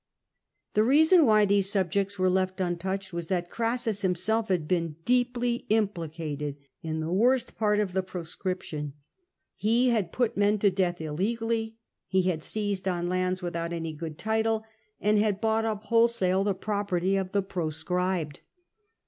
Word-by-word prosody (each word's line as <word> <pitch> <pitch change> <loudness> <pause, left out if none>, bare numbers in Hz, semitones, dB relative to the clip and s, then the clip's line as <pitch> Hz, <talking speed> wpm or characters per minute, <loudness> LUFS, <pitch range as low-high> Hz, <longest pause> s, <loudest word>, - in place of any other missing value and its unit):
The 210 - +4
reason 315 +6 +5
why 215 -1 +5
these 200 -1 +2
subjects 200 +1 0
were 185 0 +2
left 185 0 0
untouched 190 +2 -2
was 170 -1 -4
that 175 -1 -2
Orassus 230 -2 -1
himself 200 +4 +1
had 175 -5 0
been 165 -3 0
deeply 245 -1 +1
implicated 160 -8 -1 0.2
in 160 -1 -3
the 160 +2 -2
worst 245 +5 +2
part 210 -1 +2
of 205 -3 0
the 190 - +1
Pro 185 -2 -6
scription. 160 -4 -4 0.6
He 235 +4 +2
had 210 -8 0
put 240 -3 0
men 205 +1 +3
to 200 -1 +3
death 180 -2 0
illegally, 225 +8 -2 0.3
had 185 -4 +1
seized 200 0 -2
on 175 -1 -1
lands 185 0 -1
without 170 -1 -3
any 165 -1 -4
good 155 0 -7
title, 220 +3 0 0.4
and 210 0 +3
had 205 -2 +1
bought 225 0 +1
up 215 -1 -2
whole 230 +1 +4
sale 190 -5 +1
the 200 -1 0
property 195 -2 -1
of 190 -1 -1
the 200 0 +1
proscribed. 175 -2 -2
190 Hz, 155 wpm, -27 LUFS, 175-220 Hz, 0.6 s, reason